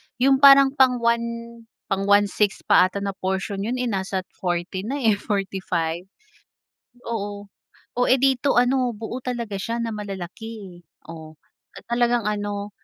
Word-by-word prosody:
yung 265 +1 +3
parang 275 -1 +8
pang 260 -2 +4
1 235 0 +1 0.6
pang 195 0 0
1/6 205 0 +2
pa 200 -3 +5
ata 200 +1 -6
na 200 - -1
porsyon, 190 +1 -3 0.2
eh, 250 - -2
nasa 190 -4 -2
40 180 +2 -3
na, 275 - -2
eh, 225 -7 +1
45. 185 -4 -2 1.0
Oo 205 -2 -5 0.5
oh, 245 - +3
eh, 260 0 +3
dito 270 0 +2
ano 250 0 +2
buo 225 +3 -6
talaga 235 -5 -3
siya 230 +4 -3
na 230 - -2
malalaki 200 -2 -8 0.2
oh 160 -1 -10 0.4
at - - -13
talagang 240 0 +2
ano. 205 -1 -3
205 Hz, 140 wpm, -23 LUFS, 195-240 Hz, 1.0 s, parang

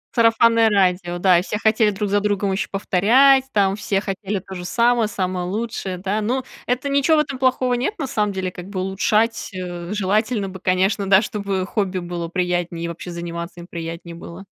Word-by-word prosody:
Сарафанное 230 -1 +4
радио, 180 -3 +1
да, 180 -1 +4
и - - -1
все 210 - -3
хотели 220 0 +3
друг 205 0 -2
за 205 - +3
другом 205 -1 0
еще 190 - -1
повторять, 245 +8 +4
там 195 -3 +2
все 195 -1 -1
хотели 195 0 -3
то 190 +1 -11
же 180 - -6
самое, 235 +3 +2
самое 185 -3 -2
лучшее, 205 -2 -3
да, 195 +4 -2
но 250 +5 -1 0.2
это 250 +3 -1
ничего, 280 +3 +3
в - - +5
этом 275 -3 -5
плохого 255 -1 +2
нет. 255 - -1
На 295 - -2
самом 210 -4 0
деле 190 -1 -3
как 180 +1 -9
бы 195 -2 -4
улучшать, 210 +4 0
э, 175 0 -6
желательно 210 +1 0
бы, 190 0 -9
конечно, 190 +2 +1
да, 195 +2 +6
чтобы 200 -3 -2
хобби 195 -2 -2
было 175 -1 -4
приятнее 175 -1 -2
и - - -2
вообще 170 +1 -7
заниматься 170 0 -6
им 170 - -9
приятнее 165 0 -7
было. 170 +3 -10
195 Hz, 195 wpm, -21 LUFS, 180-225 Hz, 0.2 s, да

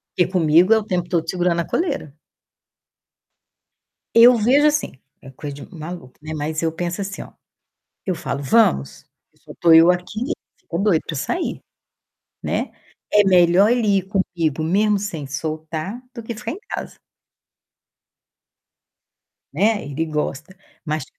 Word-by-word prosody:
Porque 180 0 +1
comigo 175 +3 +4
é - - +5
o - - -6
tempo 175 -3 -2
todo 165 -2 0
segurando 175 -2 0
a 170 - -5
coleira. 280 - -2 2.0
Eu 240 +2 +8
vejo 270 +7 +4
assim, 300 0 0 0.3
é 135 - -12
coisa 145 +2 -7
de 145 +6 -12
maluco, 160 -4 -8
né, 155 +1 -6
mas 155 +1 -3
eu 165 -1 0
penso 175 +4 -4
assim 195 0 -5
ó, - - -15 0.7
eu 185 - 0
falo: 140 -4 -4
"Vamos". 130 - +2 0.3
E - - -32
só - - -13
tô 170 -1 +4
eu 165 +1 +8
aqui, 180 +4 -1 0.4
ficou 170 - -5
doido 195 -7 +3
pra 155 - -4
sair, 350 - -3 0.8
né. - - -2 0.4
É 210 0 +5
melhor 185 +2 +5
ele 215 -5 +2
ir - - -2
comigo 170 -6 -1
mesmo 205 +5 +2
sem 165 -8 -5
soltar, 155 - -5
do 235 - -7
que 230 +1 -6
ficar 230 +1 -6
em 345 - -5
casa. - - -6 2.6
Né, 215 +1 +1
ele 145 +3 -3
gosta. 155 +2 -4 0.3
Mas 155 -3 -3
175 Hz, 145 wpm, -21 LUFS, 155-210 Hz, 2.6 s, Eu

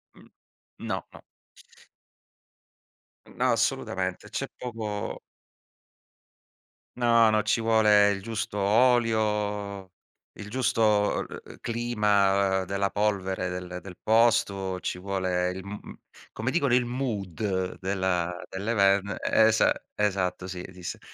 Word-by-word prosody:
Mh, - - -18 0.5
no, - - -3
no. - - -13 2.1
No, - - 0
assolutamente. - - -1
C'è - - -3
poco 110 -4 -5 1.8
No, 115 -2 +5
no, 110 0 +3
ci 105 +2 +1
vuole 105 -2 +5
il 100 -1 -3
giusto 110 -1 -4
olio, 105 -3 +1 0.5
il 105 -1 -7
giusto 110 -4 +1
e - - -10
e - - -23
clima 100 -5 +1
della 100 +1 -1
polvere 95 -3 -1
del 90 0 -5
del 90 -1 -11
posto, 100 -5 +2
ci 90 - -3
vuole 90 -1 -1
il 95 - -6
m 105 +1 -6
m - - -10 0.4
come 115 +4 -2
dicono 140 -6 +1
il 125 0 +4
mood 100 -6 -3
della 95 -2 -1
dell'even 100 -1 +1
esa 110 0 +4 0.2
esatto, 95 -3 -1
sì, 90 -1 -6
esiste, 90 -1 -7
100 Hz, 110 wpm, -27 LUFS, 95-110 Hz, 2.1 s, No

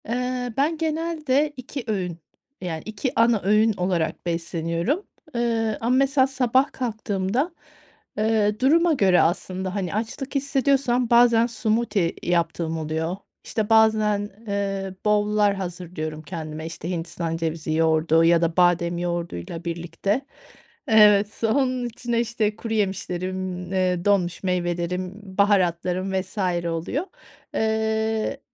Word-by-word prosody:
Eee, 250 +1 -2
ben 305 +4 +1
genelde 310 -3 0
2 260 +1 -6
öğün, 185 -6 -2 0.4
yani 165 -4 -4
2 220 +4 -3
ana 230 -2 +4
öğün 215 +3 +4
olarak 180 -4 -1
besleniyorum, 170 - -2 0.3
eee, 230 -2 0
ama 240 +3 +2
mesela 270 0 +3
sabah 260 0 +2
kalktığımda, 220 - -2 0.7
eee, 215 -1 +1
duruma 330 +6 +4
göre 190 -9 +4
aslında, 185 +3 -1
hani, 185 -4 -2
açlık 245 +6 -4
hissediyorsam, 270 -3 +1
bazen 235 -1 +5
smoothie 220 -5 0
yaptığım 165 -1 0
oluyor 160 +3 -2 0.3
İşte 220 -1 -2
bazen, 215 -2 +3 0.2
eee, 195 -1 -2
bowl'lar 210 -1 +3
hazırlıyorum 175 -4 -5
kendime, 155 -1 -6
işte, 165 0 -6
hindistan 165 -1 -3
cevizi 160 -1 -2
yoğurdu 160 0 +3
ya 170 0 +5
da 165 0 0
badem 175 -1 +3
yoğurduyla 170 - -4
birlikte 170 +7 -2 0.7
Evet, 210 -2 +5
onun 255 +2 +1
içine 240 0 -2
işte 225 -2 0
kuruyemişlerim, 185 -4 -2 0.2
eee, 185 -2 0
donmuş 195 -4 +1
meyvelerim, 180 0 -1 0.2
baharatlarım 185 -2 +2
vs. 190 +2 -3 0.3
oluyor. 170 - -2 0.5
Eee, 220 +2 0
205 Hz, 115 wpm, -24 LUFS, 175-235 Hz, 0.7 s, bazen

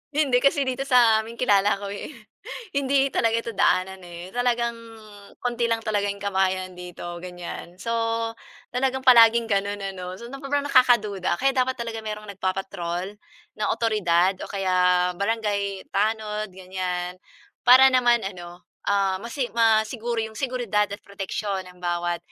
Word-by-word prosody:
Hindi, 280 -5 +3
kasi 280 +1 +3
dito 260 +1 -1
sa 240 -5 +5
amin 230 +1 -11
kilala 205 -4 +3
ako 200 - -6
eh. 205 - -7 0.6
Hindi 275 0 +2
talaga 230 0 +2
ito 230 0 -4
daanan 190 -1 +1
eh, 175 +1 -10
talagang 240 -1 0 0.6
konti 240 -1 -1
lang 230 - +2
talaga 205 -2 0
'yong 200 - -4
kabahayan 190 -2 0
dito 175 -1 -8
ganiyan. 175 0 -8
So, 215 +5 -4 0.8
talagang 265 +1 -1
palaging 235 -2 +7
ganun 200 -1 0
ano, 185 -2 -6
so 235 - -10
na 270 +2 -9
sobrang 285 +1 -1
nakakaduda 235 -8 +3
kaya 270 +1 +2
dapat 260 0 0
talagang 230 -2 -5
mayroong 210 -1 -6
nagpapatrol 185 -1 -3 0.4
na 215 - -2
awtoridad 190 -5 +1
o - - -7
kaya 180 -2 +2
barangay 200 -1 -2
tanod 215 0 -1
ganiyan, 180 -1 -4 0.4
para 260 +2 +8
naman 240 -3 +3
ano, 175 -2 -8 0.2
ah, 195 -2 +1
masi 235 +4 -3
masiguro 230 +1 +1
'yong 220 0 -5
seguridad 240 -6 0
at 200 - -5
proteksiyon 200 0 -4
ng 180 - -17
bawat 175 0 -1
210 Hz, 145 wpm, -24 LUFS, 185-235 Hz, 0.8 s, para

